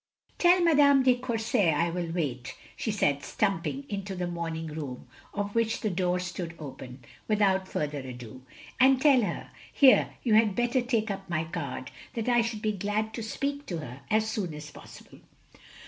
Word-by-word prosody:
"Tell 355 Hz, +1 st, +5 dB
Madame 285 Hz, -4 st, +5 dB
de 255 Hz, -1 st, +5 dB
Courset 225 Hz, -, +1 dB
I 170 Hz, +3 st, +1 dB
will 170 Hz, -1 st, -3 dB
wait," 135 Hz, -8 st, -3 dB, 0.2 s
she -, -, -3 dB
said, 145 Hz, -9 st, +1 dB
stumping 200 Hz, -, -1 dB
into 195 Hz, -2 st, -4 dB
the 180 Hz, -1 st, -2 dB
morning 165 Hz, -2 st, -4 dB
room, 150 Hz, -5 st, -6 dB, 0.3 s
of 205 Hz, 0 st, -3 dB
which 230 Hz, -1 st, 0 dB
the 215 Hz, -, 0 dB
door 180 Hz, 0 st, +1 dB
stood 180 Hz, -1 st, -5 dB
open, 130 Hz, -3 st, -9 dB, 0.2 s
without 195 Hz, -3 st, +2 dB
further 150 Hz, -4 st, -2 dB
ado. 125 Hz, -2 st, -9 dB, 0.4 s
"And 260 Hz, 0 st, +6 dB
tell 270 Hz, -3 st, +5 dB
her 210 Hz, -, -4 dB
— -, -, -20 dB
here, 260 Hz, -7 st, +5 dB
you 230 Hz, -, +2 dB
had 215 Hz, -2 st, +4 dB
better 240 Hz, +1 st, +1 dB
take 230 Hz, -3 st, 0 dB
up 195 Hz, -1 st, -6 dB
my 160 Hz, -2 st, 0 dB
card 160 Hz, -6 st, -5 dB
— -, -, -19 dB
that 230 Hz, -1 st, -3 dB
I 240 Hz, -1 st, +4 dB
should 230 Hz, -2 st, -4 dB
be 215 Hz, -, +2 dB
glad 210 Hz, +2 st, -2 dB
to 230 Hz, -, -4 dB
speak 280 Hz, +6 st, -3 dB
to 175 Hz, -, -3 dB
her 130 Hz, -3 st, -8 dB
as 215 Hz, 0 st, +2 dB
soon 200 Hz, -8 st, -3 dB
as 150 Hz, 0 st, -9 dB
possible. -, -, -14 dB
195 Hz, 185 wpm, -28 LUFS, 160-230 Hz, 0.4 s, And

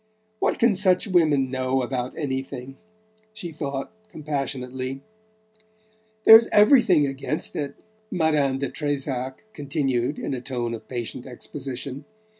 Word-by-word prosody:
"What -, -, +1 dB
can 235 Hz, -2 st, +4 dB
such 185 Hz, -2 st, +4 dB
women 155 Hz, -9 st, +2 dB
know 130 Hz, 0 st, 0 dB
about 125 Hz, 0 st, -3 dB
anything?" 135 Hz, -2 st, -4 dB, 0.6 s
she 210 Hz, -6 st, -6 dB
thought 140 Hz, +1 st, -4 dB, 0.2 s
compassionately. 135 Hz, -4 st, -4 dB, 1.2 s
"There's 225 Hz, +1 st, +10 dB
everything 210 Hz, -, +5 dB
against 135 Hz, +2 st, -3 dB
it," 145 Hz, -2 st, -3 dB, 0.3 s
Madame 155 Hz, -6 st, +1 dB
de 140 Hz, +1 st, -2 dB
Trezac 135 Hz, -, -3 dB
continued 140 Hz, -, -1 dB
in -, -, -3 dB
a 125 Hz, -, -4 dB
tone 120 Hz, -2 st, -3 dB
of 115 Hz, -, -8 dB
patient 120 Hz, +1 st, -5 dB
exposition. 135 Hz, +2 st, -6 dB
140 Hz, 115 wpm, -24 LUFS, 130-155 Hz, 1.2 s, There's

